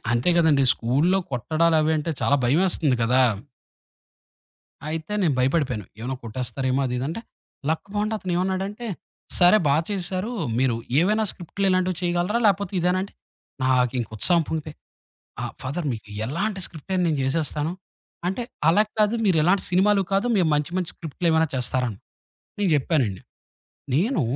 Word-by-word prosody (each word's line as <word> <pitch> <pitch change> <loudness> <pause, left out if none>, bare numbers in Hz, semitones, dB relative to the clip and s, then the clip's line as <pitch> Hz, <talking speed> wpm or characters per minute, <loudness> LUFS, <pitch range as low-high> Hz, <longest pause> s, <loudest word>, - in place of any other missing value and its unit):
అంతే 120 +9 +2
కదండి 155 -5 +4
స్కూలులో 150 +11 +1
కొట్టడాలు 160 +7 +1
అవి 155 +1 +2
అంటే 165 +2 -2
చాలా 145 - +3
భయమేస్తుంది 150 -1 +2
గదా! 125 +3 +4 1.7
అయితే 160 +5 -4
నేను 155 -6 +2
భయపడిపోయాను. 130 - 0
ఏమైనా 130 +3 -3
కొట్టేస్తారేమో 130 +3 -2
అది 125 - -3
ఇదంటే, 155 - -3 0.5
లక్ 160 +4 -1
బావుండి 210 +1 0
అతనేమన్నాడంటే, 190 +5 -2 0.5
"సరే, 180 +4 +7
బా 140 - +4
చేశారు. 190 +3 -2 0.3
మీరు 130 -3 +2 0.3
ఏవైనా 215 +5 +2
స్క్రిప్టులు 195 +3 -3
ఇలాంటివి 185 -1 +1
చేయగలరా? 175 +6 0
లేపోతే 200 -1 +1
ఇదేనా?" 180 +2 +2
అంటే, 200 - -8 0.5
నాకింక 125 -2 +1
ఉత్సాహం 170 - +3
పొంగిపోయి, 155 -1 -4 0.7
ఆ! - - -2 0.2
ఫాదర్ 145 +5 -3
మీకు 110 -2 -8 0.2
ఎలాంటి 195 - -2
స్క్రిప్ట్ 160 +3 -13
అయినా 185 -1 +2
నేను 150 -3 0
జేసేస్తాను. 150 +3 -1 0.6
అంటే, 215 +6 -2 0.3
"అలా 205 +6 +5 0.2
కాదు 215 +2 +3
మీరెలాంటి 180 +1 +3
సినిమాలు 195 +2 +3
కాదు, 195 +4 +2
మేం 175 -4 +3
మంచి 150 +3 -1
మంచి 180 -2 -1
స్క్రిప్టులేమైనా 160 0 0
చేస్తారా?" 125 0 0
అని, 100 - -10 0.6
నేను 195 -3 +2
జెప్పానండి. 130 - +1 0.7
నేను 210 - +1
165 Hz, 140 wpm, -24 LUFS, 135-185 Hz, 1.7 s, సరే